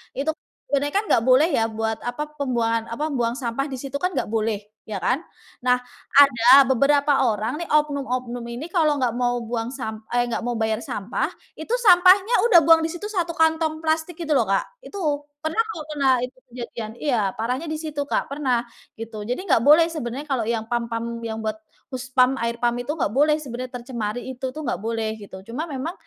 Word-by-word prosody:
itu 285 +4 0
kan 330 - -17 0.2
sebenernya 285 +1 0 0.2
gak 225 - +3
boleh 260 +5 +5
ya 225 - +2
buat 220 0 -2
apa, 300 +5 -4
pembuangan 230 -5 -1
apa, 295 +6 -2
buang 240 0 0
sampah 250 0 -2
di 260 - -4
situ 275 +1 -7
kan 365 +1 +1
gak - - +1
boleh, 220 -1 0 0.3
ya 205 - -3
kan. 255 - 0 0.4
Nah, 250 0 +4 0.4
ada 265 0 +7
beberapa 280 +3 +3 0.2
orang 220 +10 -3
nih 340 - -6
oknum-oknum 265 -5 0
ini 245 +6 -5
kalau 305 -4 +3
nggak 245 -3 +1
mau 245 0 0
buang 230 0 -3
sam 220 -5 -6
eh 245 0 +2
nggak 235 - -2
mau 240 -1 -2
bayar 220 0 0
sampah, 230 -6 -2 0.3
itu 315 +6 -9 0.2
sampahnya 375 +4 +6 0.2
udah 345 - +9
buang 325 -1 +7
di 325 - -1
situ 350 +4 -7
1 355 -5 -1
kantong 320 -1 +2
plastik 320 +1 -1
gitu 315 -3 -1
loh, 235 - +4
Kak. 195 - +2 0.2
Itu 405 - -9 0.4
pernah 315 +9 0
kok, 335 -8 -5
pernah 275 -2 +3
itu 255 +1 -15
kejadian. 235 -3 -6
Iya 275 -5 +2 0.2
parahnya 250 +8 -2
di 310 - -2
situ, 305 -3 -4
Kak, 285 - -1
pernah 260 -4 -1 0.3
gitu 225 -2 -6
jadi 250 - 0
nggak 245 -6 +4
boleh 310 +3 +7
sebenarnya 285 -3 -5
kalau 260 -5 0
yang 220 -1 -3
PAM 235 0 -2
PAM 230 0 -2 0.2
yang 220 -1 -4
buat 215 - -1 0.4
hus 255 0 -5
PAM, 255 +1 +4
air 235 0 -1
PAM 240 0 +1
itu 245 - -11
nggak 210 - 0
boleh 300 +2 +4
sebenarnya 255 -3 -6
tercemari 235 -2 -4
itu 255 +1 -6
tuh 310 - -7
nggak 235 - -2
boleh 225 0 -2
gitu, 195 -2 -10 0.2
cuma 310 - -2
memang 285 +5 -4
255 Hz, 200 wpm, -23 LUFS, 235-300 Hz, 0.4 s, udah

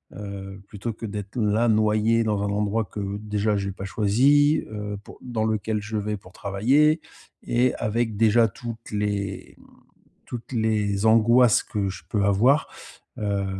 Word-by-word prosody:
heu, 100 -1 -8
plutôt 110 +3 -5
que 115 - -8
d'être 105 +2 -7
là, 110 +2 +2
noyé 110 +1 +3
dans 105 -2 0
un 100 - -1
endroit 105 +2 0
que, 100 -1 -5
déjà, 105 0 -1
j'ai 100 -1 -2
pas 95 - -7
choisi, 130 - +3
heu, 105 -1 -5
pour - - -14
dans 115 -3 -2
lequel 110 0 -1
je 105 +1 -6
vais 105 0 -2
pour 95 -1 -16
travailler 135 +11 +2 0.4
et 125 +1 +1
avec 110 0 -1
déjà 115 +1 +4
toutes 115 +2 -8
les, 100 -2 -3
mmh, - - -18 0.6
toutes 120 0 -8
les 105 -3 0
angoisses 115 +1 +5
que 100 -2 -2
je 95 -2 -8
peux 105 -2 0
avoir, 120 +10 +3 0.5
heu, 100 -2 -1
105 Hz, 160 wpm, -24 LUFS, 100-115 Hz, 0.6 s, angoisses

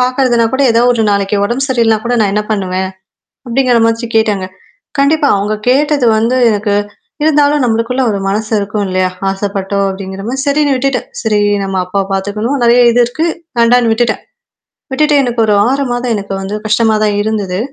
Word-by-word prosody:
பார்கறதுனா 250 -2 +2
கூட 265 +1 +1
ஏதாவது 235 +2 +3
ஒரு 230 -2 0
நாளைக்கு 200 0 0
உடம்பு 245 +6 -1
சரி 255 -3 +1
இல்லனா 225 -1 +2
கூட 245 +1 0
நான் 200 -2 +1
என்ன 210 - 0
பண்ணுவேன்? 190 -2 -2 0.6
அப்படிங்கிற 250 0 +1
மாச்சி 230 +1 -1
கேட்டாங்க. 210 -4 +1 0.5
கண்டிப்பா. 290 +2 +2
அவங்க 210 +2 -1
கேட்டது 285 0 +2
வந்து 230 +4 +1
எனக்கு 210 -1 -1 0.5
இருந்தாலும் 295 -2 +3
நம்மளுக்குள்ள 230 +3 0
ஒரு 200 - -2
மனசு 215 +2 -3
இருக்கும் 205 +1 -3
இல்லையா? 185 0 0 0.2
ஆசப்பட்டோம் 195 0 -2
அப்படிங்கிற 190 0 -7
மாரி 265 +3 -2
சரின்னு 285 -1 +2
விட்டுட்டன். 260 0 -1
சரி 215 -2 +1 0.2
நம்ம 195 -1 -3
அப்பாவ 195 +2 -1
பாத்துக்கணும். 210 +7 -2
நெறைய 240 +1 +5
இது 245 +1 +3
இருக்கு. 310 +7 -2 0.3
வேண்டான்னு 235 0 +3
விட்டுட்டன். 225 -1 -1 0.7
விட்டுட்டு 300 +3 +2
எனக்கு 240 -2 -2
ஒரு 210 - +2 0.2
6 275 +2 0
மாதம் 245 0 -2
எனக்கு 200 -1 -6
வந்து 195 +2 -4
கஷ்டமா 220 +1 +2
தான் 205 -1 0
இருந்தது. 205 -4 -2
230 Hz, 170 wpm, -13 LUFS, 205-255 Hz, 0.7 s, நெறைய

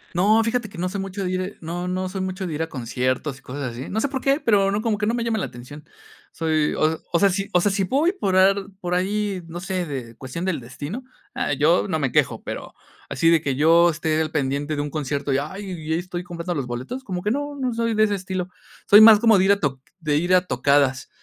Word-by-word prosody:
No, 215 +5 +4
fíjate 230 -1 -1
que - - -13
no 180 +1 -1
soy 200 0 -4
mucho 195 +1 -5
de 180 - -2
ir 185 +2 -3
no, 175 +2 -4
no 185 +1 -2
soy 190 +1 -4
mucho 185 0 -3
de 170 - -4
ir 150 - -3
a 160 - -2
conciertos 130 +2 -2
y - - -24
cosas 135 -1 -5
así. 120 +3 -7
No 220 - -1
sé 255 - +1
por 265 -2 -3
qué, 275 +2 +2
pero 200 -6 +3
no, 205 +2 0
como 220 -3 0
que 210 - 0
no 230 - +1
me 240 - -1
llaman 225 -3 -1
la - - -2
atención. 135 +5 -11 0.5
Soy, 155 -2 0
o 155 +1 +1
o 170 - +2
sea, 200 - +5
si 195 +2 -2
o 180 - +4
sea, 205 - +2
si 195 0 0
puedo 295 - +2
por 190 -2 0
ar 190 +1 +5 0.2
por 180 -1 -3
ahí, 195 +1 -1
no 170 +1 -7
sé, 185 -1 -3
de 125 -5 -6
cuestión 130 +9 -6
del 185 -6 -1
destino, 145 - -7 0.3
ah, - - -1
yo 155 +7 +3
no 185 - -1
me 135 -5 -1
quejo, - - +1
pero - - -7 0.3
así 165 - +2
de 165 -2 +4
que 140 -4 -1
yo 165 +4 +5
esté 160 -1 0
al 155 - -1
pendiente 145 0 -1
de 145 - -1
un 145 - -5
concierto 140 -1 -2
y, - - +3
ay, 190 +8 -6
y 160 -3 -4
ahí 165 - +1
estoy 180 0 -5
comprando 175 0 -5
los 140 -6 -3
boletos, 130 - -5
como 180 -6 -5
que 210 - 0
no, 290 +3 -3
no 260 -3 -2
soy 230 -1 -1
de 215 - +4
ese 205 -1 +2
estilo. 185 -1 -4 0.4
Soy 205 +1 +9
más 220 -1 +9
como 225 -3 +5
de 185 - +3
ir 195 - +5
a 200 - +3
toc 135 -6 -2 0.2
de 150 -3 0
ir 175 +4 +3
a 185 0 +3
tocadas, 135 -2 +1
180 Hz, 265 wpm, -23 LUFS, 150-200 Hz, 0.5 s, Soy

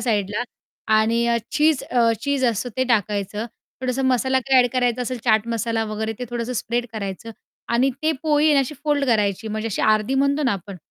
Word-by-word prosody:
साईडला 210 -1 0 0.6
आणि 230 +2 +2 0.2
चीज 300 -1 +2
अ, 235 -2 +2
चीज 280 -2 0
असतं 235 0 0
ते 260 - +2
टाकायचं 210 0 0 0.3
थोडासा 255 +1 -1
मसाला 260 0 +2
काही 260 0 +4
ॲड 245 - 0
करायचा 250 -1 +1
असेल 250 0 -3
चाट 220 -1 +3
मसाला 230 -1 -1
वगैरे 220 +1 -3
ते 250 - -4
थोडंसं 240 +1 -3
स्प्रेड 240 0 -2
करायचं 200 +1 -5 0.4
आणि 240 +3 +2
ते 315 +1 +2
पोळी 305 0 +3
आणि 290 - +4
अशी 270 +3 -3
फोल्ड 295 -2 +1
करायची 210 -2 +1
म्हणजे 215 +1 -3
अशी 210 - -2
अर्धी 215 +4 +2
म्हणतो 280 +2 +2
ना 255 - +2
आपण 195 0 -6
235 Hz, 185 wpm, -22 LUFS, 220-260 Hz, 0.6 s, काही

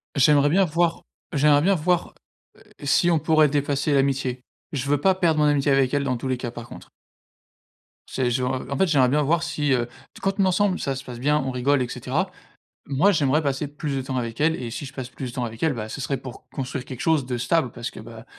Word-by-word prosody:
J'aimerais 145 +1 +5
bien 195 +5 +4
voir 170 +1 0 0.3
j'aimerais 145 0 +4
bien 195 +4 +3
voir, 175 +1 0 0.4
heu, - - -20 0.2
si 170 +5 +3
on 165 - +3
pourrait 155 -2 +4
dépasser 145 +1 0
l'amitié. 135 -2 0 0.3
Je 140 -2 -3
veux 145 -1 +2
pas 190 +2 +4
perdre 165 -4 +2
mon 150 - +4
amitié 145 -1 +2
avec 135 -2 +3
elle, 145 -1 +1
dans 130 -3 -1
tous 125 - -5
les 130 -1 0
cas, 120 -2 -5
par 120 0 -9
contre. - - -12 1.2
C'est 130 -2 -1
je 125 +2 0
en 130 +1 -2
en 140 - -2
fait, 190 - +4
j'aimerais 135 -5 +4
bien 150 +2 +2
voir 165 +4 +1
si, 150 -5 0
heu 120 -1 0 0.3
quand 195 0 +1
on - - +5
est 190 - +3
ensemble, 190 0 +1
ça 135 -1 -2
se 135 - -7
passe 120 -1 -8
bien, 150 +3 +2
on 130 -1 -2
rigole 130 +2 +1
et 125 - -1
cetera. - - -2 0.6
Moi, 145 +9 +3
j'aimerais 150 -1 +2
passer 140 0 -1
plus 145 -1 -4
de 135 - -1
temps 130 0 -4
avec 115 -1 -4
elle 160 +2 +3
et 120 -2 -5
si 140 +4 -5
je 130 - -10
passe 130 -2 -5
plus 130 -2 -6
de - - -13
temps 125 - -2
avec 115 0 -7
elle, 160 -4 +2
bah, 110 -2 -5
ce 140 - -6
serait 135 +1 -1
pour 130 -1 -10
construire 130 -1 -4
quelque 130 -3 -8
chose 155 -5 +2
de 125 -1 -2
stable. 130 +1 +1
Parce 120 +1 -6
que, - - -10
bah, 110 +1 -11
140 Hz, 250 wpm, -24 LUFS, 125-150 Hz, 1.2 s, J'aimerais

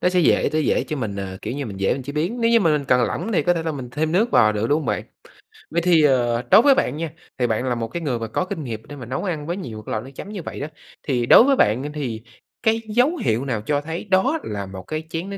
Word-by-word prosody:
nó - - +3
sẽ 180 0 +2
dễ 155 - +3
sẽ 155 - +2
dễ 150 - +1
cho 155 - -4
mình, 110 -7 -3
à, 95 -1 -5
kiểu - - -4
như, 140 - -3
mình 100 -3 -7
dễ 115 +7 0
chế 140 +3 -6
biến, 175 +11 -2
nếu 230 - +3
như 230 -1 +5
mà 165 -5 +3
mình 150 -2 0
cần 125 -2 +3
lỏng 175 - -2
thì 170 - +2
có 175 +4 +2
thể 165 - -2
là 160 - -2
mình 130 -4 -6
thêm 155 +5 -1
nước 220 +7 +2
vào 110 - +5
nữa, 105 +1 -1
đúng 145 +5 +2
hông 155 - -6
bạn? - - -1 0.7
Vậy 170 +2 0
thì, 170 -2 +4
ờ, 120 -4 +3
đối - - +9
với 275 +1 +5
bạn 135 - 0
nha, 165 -1 -4 0.3
thì 125 - +1
bạn 110 +1 0
là 125 - 0
một 115 -1 -3
cái 170 +8 -5
người 130 -7 -1
mà 115 - -4
có 180 +11 -1
kinh 185 -5 -5
nghiệm 110 -4 -6
để 145 - -9
mà 125 - -8
nấu 130 - -3
ăn 155 -6 -3
với 175 +2 -2
nhiều 115 - -7
cái - - -7
loại 110 +1 -2
nước 135 - -11
chấm 200 - -8
như 205 -3 -5
vậy - - -7
đó, 145 - -3 0.4
thì 125 -4 0
đối 175 - +8
với 275 +1 +4
bạn 115 - +2
á, 145 - -4
thì 125 -7 -4 0.4
cái 225 0 +2
dấu 250 +10 +3
hiệu 115 - 0
nào 120 -6 -2
cho 145 +6 0
thấy 160 +3 -5
đó 225 +12 +3
là 100 -1 -4
1 95 -1 -9
cái 155 0 -4
chén 170 +4 -4
nước 200 - -5
145 Hz, 310 wpm, -22 LUFS, 120-175 Hz, 0.7 s, đối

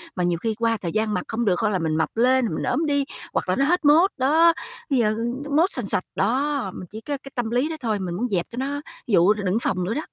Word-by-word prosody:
mà 180 - -1
nhiều 175 -1 +1
khi 225 -1 -1
qua 230 -1 +1
thời 170 - -3
gian 215 +1 0
mặc 180 - -1
không 230 +1 -2
được 180 -3 +2
hoặc 220 - +1
là 190 -3 0
mình 160 -1 -1
mập 160 - +1
lên, 255 +1 +4
rồi - - -2
mình - - -3
ốm 320 - 0
đi 285 -2 +1 0.3
hoặc - - -1
là 185 - +2
nó 275 - +2
hết 350 +1 +1
mốt, 320 +7 +6
đó, 320 +6 +4 0.4
bây 270 - +2
giờ, 215 -3 +3
ừ, 245 +5 -4
mốt 340 +5 +4
xoành 250 - 0
xoạch. 185 - +1
Đó, 255 +1 0
mình 180 - -8
chỉ 220 +2 -8
có 285 +2 -3
cái 275 - -10
tâm 240 -2 -1
lý 250 +6 +1
đó 325 - -3
thôi, 220 -3 -1
mình 180 -2 -4
muốn 240 +5 -2
dẹp 180 -4 0
cho 235 - -9
nó 285 +2 -2 0.3
dụ 195 -2 +5
đ 215 - -8
đừng 190 +4 +1
phòng 185 -5 -1
nữa 195 +6 -1
đó. 305 - -2
230 Hz, 295 wpm, -23 LUFS, 195-280 Hz, 0.4 s, mốt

